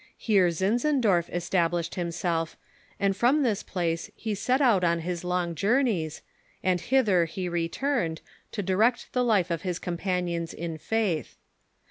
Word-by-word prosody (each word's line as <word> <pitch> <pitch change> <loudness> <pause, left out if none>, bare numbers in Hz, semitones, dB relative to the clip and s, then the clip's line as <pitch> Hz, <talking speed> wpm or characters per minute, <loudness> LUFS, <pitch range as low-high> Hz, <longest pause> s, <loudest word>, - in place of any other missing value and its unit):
Here 195 -5 +3
Zinzendorf 205 - +1
established 175 -1 0
himself, 170 -2 -2 0.4
and 195 -1 +2
from 255 +8 +3
this 220 -6 +1
place 165 -3 -2
he 220 -2 -3
set 250 +6 +1
out 230 -10 +4
on 170 -1 +2
his 175 +1 -4
long 180 -1 -1
journeys, 200 - 0 0.4
and 180 -2 +1
hither 210 -10 +3
he 180 +3 -4
returned, 170 - -1 0.3
to 205 - -2
direct 215 +6 +1
the 250 - +2
life 200 -7 +2
of 165 -1 -1
his 180 -3 -2
companions 175 -2 -2
in 165 -1 -5
faith. 210 -5 -1
180 Hz, 140 wpm, -27 LUFS, 170-220 Hz, 0.4 s, out